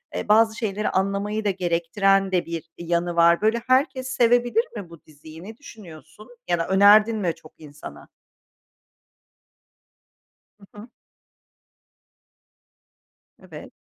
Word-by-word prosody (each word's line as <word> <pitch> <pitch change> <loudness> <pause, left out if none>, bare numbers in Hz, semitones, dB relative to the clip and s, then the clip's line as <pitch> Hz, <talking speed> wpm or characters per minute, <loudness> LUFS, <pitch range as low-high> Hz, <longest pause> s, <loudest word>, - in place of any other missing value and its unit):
eee, - - -5
bazı 220 +1 +3
şeyleri 210 -3 -3
anlamayı 200 +3 -2
da 205 - +1
gerektiren 190 +2 0
de 180 -2 -1
bir 165 -1 -7
yanı 170 0 -3
var. 170 0 +3
Böyle, 220 +2 0
herkes 260 0 0
sevebilir 245 - +1
mi 200 -6 -8
bu 170 -2 -16
diziyi, 155 +2 -15
ne 220 +3 -11
düşünüyorsun 205 - -15 0.2
ya 175 - 0
da 165 - -3
önerdin 210 +3 +4
mi 180 -5 -2
çok 155 - -20
insana? 150 -1 -13 2.5
Hı 200 - -17
hı. 215 +4 -12 2.5
Evet. - - -13
195 Hz, 115 wpm, -22 LUFS, 170-220 Hz, 2.5 s, önerdin